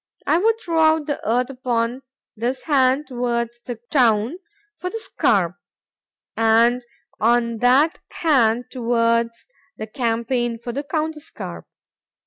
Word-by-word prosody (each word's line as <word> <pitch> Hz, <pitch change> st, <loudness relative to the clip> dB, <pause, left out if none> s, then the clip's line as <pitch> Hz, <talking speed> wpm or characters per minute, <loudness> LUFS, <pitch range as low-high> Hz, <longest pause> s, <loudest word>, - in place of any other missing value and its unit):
—I 330 Hz, -, +3 dB
would 445 Hz, +4 st, +3 dB
throw 335 Hz, -6 st, -1 dB
out 315 Hz, -1 st, +4 dB
the 290 Hz, -2 st, -3 dB
earth 250 Hz, +3 st, +1 dB
upon 250 Hz, -1 st, -2 dB, 0.3 s
this 240 Hz, +4 st, -3 dB
hand 270 Hz, -1 st, +2 dB
towards 240 Hz, -2 st, -2 dB
the 245 Hz, -, -6 dB, 0.2 s
town 235 Hz, +1 st, +3 dB, 0.4 s
for 360 Hz, +3 st, -5 dB
the 450 Hz, -, -5 dB
scarp,—and 225 Hz, -, 0 dB, 0.4 s
on 235 Hz, +1 st, +2 dB
that 265 Hz, +7 st, +3 dB
hand 245 Hz, -7 st, +2 dB
towards 230 Hz, -1 st, 0 dB, 0.3 s
the 215 Hz, -, -5 dB
campaign 235 Hz, 0 st, -1 dB
for 240 Hz, +1 st, -6 dB
the 280 Hz, +4 st, -4 dB
counterscarp. 310 Hz, 0 st, -5 dB
245 Hz, 115 wpm, -21 LUFS, 230-290 Hz, 0.4 s, out